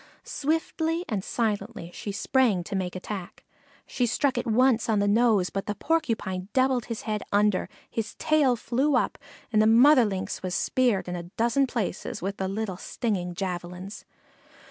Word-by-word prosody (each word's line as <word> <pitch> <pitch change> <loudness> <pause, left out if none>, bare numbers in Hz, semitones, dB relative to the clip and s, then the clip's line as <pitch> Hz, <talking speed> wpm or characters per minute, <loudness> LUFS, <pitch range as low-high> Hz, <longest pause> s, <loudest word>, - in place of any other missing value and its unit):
Swiftly 325 +3 -1
and 205 -5 -2
silently 210 -5 -2
she 205 - -5
sprang 210 -2 +2
to 195 - -5
make 185 -2 -2
attack. 185 0 -7 0.4
She 245 -2 -1
struck 265 +3 +1
it 245 +1 -2
once 235 0 +3
on 220 - +3
the 200 0 +2
nose, 210 -3 +3
but 195 0 -4
the 210 - -2
Porcupine 215 - -1
doubled 260 -2 +2
his 230 -2 -5
head 215 -1 -2
under, 205 -1 +2 0.2
his 225 -2 -4
tail 300 -5 +3
flew 260 +5 0
up, 245 - 0 0.3
and 215 - +5
the 215 - +4
mother 250 +3 +7
Lynx 190 -2 -3
was 185 -1 -3
speared 245 -8 +1
in 180 - -3
a 175 - -4 0.2
dozen 240 +4 +2
places 225 -7 -3
with 195 +2 -4
the 190 - -2
little 195 -1 -3
stinging 180 -7 -3
javelins. 180 +1 -5
215 Hz, 165 wpm, -26 LUFS, 190-250 Hz, 0.4 s, mother